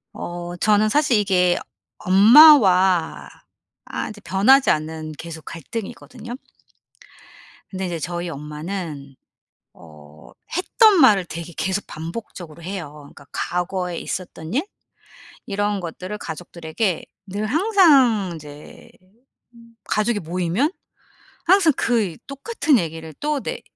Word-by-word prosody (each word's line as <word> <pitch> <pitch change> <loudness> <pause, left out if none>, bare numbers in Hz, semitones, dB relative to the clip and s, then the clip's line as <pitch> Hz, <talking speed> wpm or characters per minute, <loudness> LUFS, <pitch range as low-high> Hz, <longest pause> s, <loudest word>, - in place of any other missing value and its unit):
어 175 0 -6
저는 215 +2 +3
사실 290 -1 +2
이게 180 -3 +2 0.4
엄마와 190 - +6 0.6
아 - - -5
이제 210 -1 -11
변하지 205 - +4
않는 155 0 -2
계속 165 -2 -9
갈등이거든요. 230 +6 -8 1.3
근데 190 -1 -4
인제 175 -2 -4
저희 175 +2 -4
엄마는 150 -1 -7 0.6
어 75 -1 -16 0.3
했던 400 +2 +4
말을 205 -8 +5
되게 170 0 -8
계속 190 +2 -2
반복적으로 170 -1 -8
해요. 175 -4 -6
그러니까 140 -1 -15
과거에 180 0 -3
있었던 175 -2 -6
일 280 +6 +1 0.8
이런 205 -2 -1
것들을 185 +4 -6
가족들에게 170 +2 -4 0.2
늘 205 +2 -4
항상 280 - +4
인제 150 -2 -12 0.9
가족이 215 0 0
모이면 180 - -1 0.7
항상 355 -2 +5
그 235 -1 +1
이 175 -5 -6
똑같은 285 - 0
얘기를 160 -2 -6
또 295 -1 -1
네 - - -5
185 Hz, 240 characters per minute, -21 LUFS, 165-230 Hz, 1.3 s, 엄마와